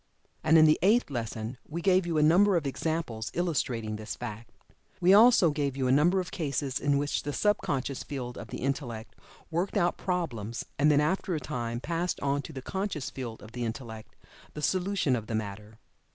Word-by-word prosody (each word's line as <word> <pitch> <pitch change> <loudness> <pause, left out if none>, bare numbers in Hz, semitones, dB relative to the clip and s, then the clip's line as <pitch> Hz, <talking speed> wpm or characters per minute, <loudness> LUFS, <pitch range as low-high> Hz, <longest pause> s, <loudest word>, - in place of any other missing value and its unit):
And 160 +1 +5
in 155 - +8
the 155 0 +4
Eighth 210 -2 +3
Lesson 115 0 -4
we 165 +3 -4
gave 185 0 +3
you 165 -2 0
a 150 - +4
number 185 +5 +5
of 160 - -2
examples 140 -6 -2
illustrating 125 -11 -1
this 105 0 -6
fact. 115 -1 -7 0.5
We 185 +1 +5
also 215 -6 +7
gave 140 -2 -2
you 130 - 0
a - - +3
number 170 +8 +4
of 180 -3 -4
cases 140 -3 -2
in 145 -1 +2
which 145 +1 -1
the 145 - -4
sub 210 +7 +2
conscious 135 -1 -2
field 125 -4 -5
of - - -8
the - - -7
Intellect 125 -4 -3 0.4
worked 175 +5 -1
out 175 -2 +2
problems, 125 - -3
and 150 +2 +5
then 145 -1 +4
after 175 +3 0
a - - -1
time 120 -5 -4
passed 170 +3 -2
on 140 0 0
to 160 - -9
the 130 -4 -8
conscious 190 -6 -3
field 120 -4 -7
of 110 - -12
the 120 +1 -4
Intellect 110 -1 -6 0.4
the 150 - -6
solution 185 -5 +1
of 110 -3 -5
the 115 - -2
matter. 105 0 -5
145 Hz, 200 wpm, -29 LUFS, 120-170 Hz, 0.5 s, in